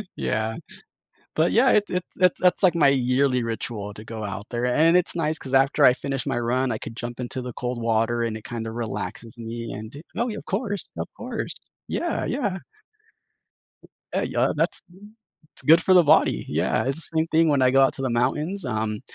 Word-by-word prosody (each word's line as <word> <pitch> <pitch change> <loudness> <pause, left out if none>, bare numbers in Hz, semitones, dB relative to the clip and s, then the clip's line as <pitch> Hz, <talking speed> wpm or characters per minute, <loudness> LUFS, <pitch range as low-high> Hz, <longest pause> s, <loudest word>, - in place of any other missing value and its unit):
Yeah. 110 0 -1 0.8
But 160 +2 +2
yeah, 250 +3 +5
it's 205 -1 +2
it's 180 0 -4
it's 180 -2 +3
that's 180 +2 +3
like 185 -3 +5
my 155 -4 +4
yearly 130 -1 +2
ritual 110 -2 -4
to 110 - -10
go 110 -1 -6
out 100 +1 -5
there, 120 +1 -1
and 160 +7 +4
it's 180 - +2
nice 155 -1 0
'cause 135 0 -6
after 135 +2 +4
I 125 - +8
finish 135 0 -4
my 120 - 0
run, 125 +2 0
I 110 - -3
could 115 - -8
jump 120 +1 -6
into 125 +1 -4
the 125 -1 -6
cold 125 0 -4
water 115 +1 +1
and 115 -2 -2
it 110 - -10
kinda 115 -1 -5
relaxes 115 0 -5
me 115 0 -6
and 110 +7 -8 0.2
Oh, 235 +2 0
yeah, 215 -2 -4
of - - -10
course, 205 -6 -3
of - - -3
course. - - -4 0.3
Yeah, 345 - -2
yeah. 205 -8 -2 1.6
A - - 0
yeah, - - +1
that's - - 0 0.7
it's - - -7
good 165 +2 +6
for 190 - +4
the 180 -1 +7
body. 150 - +3
Yeah, - - 0
it's 135 +2 -1
the 160 - -4
same 160 +1 +2
thing 165 0 +3
when 140 -2 +2
I 130 0 +4
go 135 +1 +5
out 135 - +4
to - - -6
the 130 - -1
mountains, 150 +11 0
um, 110 -3 -2
130 Hz, 205 wpm, -24 LUFS, 115-160 Hz, 1.6 s, I